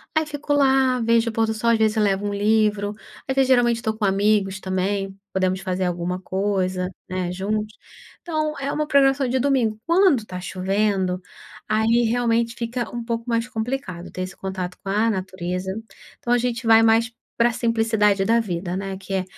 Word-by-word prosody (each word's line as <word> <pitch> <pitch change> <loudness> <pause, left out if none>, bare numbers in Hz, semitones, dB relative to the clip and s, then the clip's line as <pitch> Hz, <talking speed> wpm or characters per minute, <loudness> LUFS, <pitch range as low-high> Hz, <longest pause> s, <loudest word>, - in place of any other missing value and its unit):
Aí 315 0 +2
fico 295 0 -4
lá, 265 -3 +3
vejo 230 0 +2
o - - -8
pôr 225 0 +1
do 220 - -2
sol, 235 +2 +1
às 230 - +3
vezes 220 0 +2
eu 215 - +3
levo 200 0 +1
um 205 - -2
livro, 210 0 +1 0.3
às 265 - -1
vezes 270 -1 +3
geralmente 240 -2 +3
tô 220 -2 -2
com 215 - -2
amigos 195 -1 +2
também, 195 +1 -2
podemos 185 0 0
fazer 185 -1 -2
alguma 180 +1 -2
coisa, 185 -1 -1 0.2
né, 185 -1 -2
juntos. 210 +3 -2 0.5
Então, 310 -3 -2
é 275 0 -2
uma 305 +1 -1
programação 275 -2 +3
de 255 +2 0
domingo, 245 -5 +1
quando 335 - +3
tá 180 - -6
chovendo, 190 0 0 0.5
aí 225 +2 +2
realmente 235 0 +1
fica 235 0 -4
um 240 - -3
pouco 230 0 -3
mais 230 0 0
complicado 225 -7 -4
ter - - -7
esse 185 +1 -6
contato 185 -2 -5
com 195 - -3
a 215 +3 +2
natureza. 185 -1 -3 0.4
Então 240 - -5
a 245 - +3
gente 240 -1 -2
vai 225 0 +7
mais 225 +1 +3 0.3
pra 235 +1 +4
simplicidade 225 -4 +1
da 230 +1 +4
vida, 180 -4 -3
né. 195 0 -4
Que 195 0 -6
é, 190 -1 0
215 Hz, 190 wpm, -23 LUFS, 190-235 Hz, 0.5 s, vai